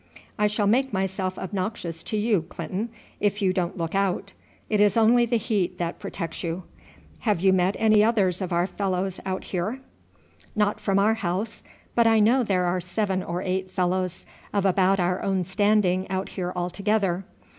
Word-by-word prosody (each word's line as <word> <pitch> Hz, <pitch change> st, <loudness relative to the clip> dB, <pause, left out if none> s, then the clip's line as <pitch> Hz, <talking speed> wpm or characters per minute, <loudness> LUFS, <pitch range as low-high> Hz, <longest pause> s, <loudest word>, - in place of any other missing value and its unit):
"I 210 Hz, -, +4 dB
shall 210 Hz, 0 st, 0 dB
make 260 Hz, +6 st, +2 dB
myself 190 Hz, -1 st, -2 dB
obnoxious 185 Hz, -3 st, -4 dB
to 215 Hz, -, -2 dB
you, 210 Hz, -3 st, +2 dB
Clinton, 210 Hz, +5 st, -4 dB, 0.3 s
if 205 Hz, 0 st, +1 dB
you 190 Hz, -3 st, +2 dB
don't 180 Hz, -1 st, -1 dB
look 165 Hz, -1 st, -3 dB
out. 195 Hz, -2 st, 0 dB, 0.3 s
It 210 Hz, -1 st, +2 dB
is 205 Hz, +1 st, +4 dB
only 235 Hz, +2 st, +5 dB
the 235 Hz, 0 st, +2 dB
heat 200 Hz, -5 st, -1 dB
that 170 Hz, -1 st, -3 dB
protects 165 Hz, -2 st, -5 dB
you. 170 Hz, +2 st, -3 dB, 0.6 s
Have 210 Hz, -7 st, 0 dB
you 190 Hz, 0 st, +5 dB
met 185 Hz, +1 st, +2 dB
any 215 Hz, -1 st, +5 dB
others 200 Hz, -5 st, +2 dB
of 185 Hz, -, -3 dB
our 175 Hz, +1 st, +2 dB
fellows 190 Hz, 0 st, -2 dB
out 190 Hz, 0 st, -2 dB
here?" 200 Hz, +8 st, -3 dB, 0.8 s
"Not 210 Hz, -1 st, +1 dB
from 195 Hz, -1 st, +1 dB
our 210 Hz, +3 st, +4 dB
house, 210 Hz, +1 st, -3 dB, 0.3 s
but 235 Hz, -1 st, +4 dB
I 225 Hz, -1 st, +5 dB
know 235 Hz, +5 st, +4 dB
there 190 Hz, -6 st, +1 dB
are 180 Hz, +1 st, 0 dB
seven 190 Hz, +1 st, -1 dB
or 175 Hz, +1 st, -3 dB
eight 185 Hz, 0 st, -2 dB
fellows 185 Hz, 0 st, -1 dB, 0.3 s
of 200 Hz, -1 st, 0 dB
about 190 Hz, +1 st, +3 dB
our 180 Hz, +1 st, +1 dB
own 190 Hz, -2 st, 0 dB
standing 190 Hz, -1 st, +2 dB
out 190 Hz, 0 st, -2 dB
here 180 Hz, -2 st, -3 dB
altogether." 195 Hz, +1 st, 0 dB
190 Hz, 175 wpm, -25 LUFS, 180-210 Hz, 0.8 s, only